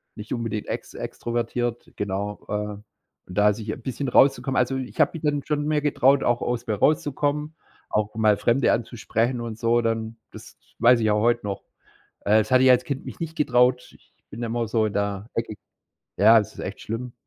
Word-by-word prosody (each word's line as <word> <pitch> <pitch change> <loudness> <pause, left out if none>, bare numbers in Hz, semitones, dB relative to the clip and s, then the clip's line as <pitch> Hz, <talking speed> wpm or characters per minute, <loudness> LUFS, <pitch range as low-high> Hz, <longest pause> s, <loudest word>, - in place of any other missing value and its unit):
nicht 105 0 -6
unbedingt 115 -3 -3
ex - - -5
extrovertiert, 120 0 -3
genau. 100 +1 -3
Äh, - - -7 0.8
und 90 +2 -10
da 105 0 +5
sich 110 0 -5
'n 125 - -7
bisschen 130 +2 -3
rauszukommen. 135 -1 +3
Also, 130 +2 +1
ich 130 -1 -7
habe - - +4
mich 165 -2 -8
dann 145 -1 0
schon 150 -1 -1
mehr 150 -1 +1
getraut, 140 -1 +3
auch 120 0 +1
aus 120 -1 -2
mir 110 - 0
rauszukommen, 150 +4 0 0.3
auch 105 0 -1
mal 105 -2 +3
Fremde 120 +5 +2
anzusprechen 120 +1 -1
und 115 -2 -5
so, 120 0 +2
dann, 115 0 -2
das - - -13 0.2
weiß 120 +1 +6
ich 110 -1 +1
auch 105 0 +2
heute 120 -1 +2
noch. 100 -1 -4 0.6
Äh, 105 +2 +3
das 110 -1 0
hatte 130 0 +5
ich 130 - +7
als 125 0 +5
Kind 140 -2 -4
mich - - -8
nicht 160 -1 -5
getraut. 125 -3 +2
Ich - - -24 0.2
bin 115 +3 -7
immer 115 0 -1
so 110 -1 +1
in 105 - -3
der 100 +1 -2
Ecke 115 -2 -3 0.6
ja, 110 +3 +7
es 105 - -2
ist - - -9
echt - - -6
schlimm, 120 +3 -5
120 Hz, 200 wpm, -24 LUFS, 110-130 Hz, 0.8 s, ich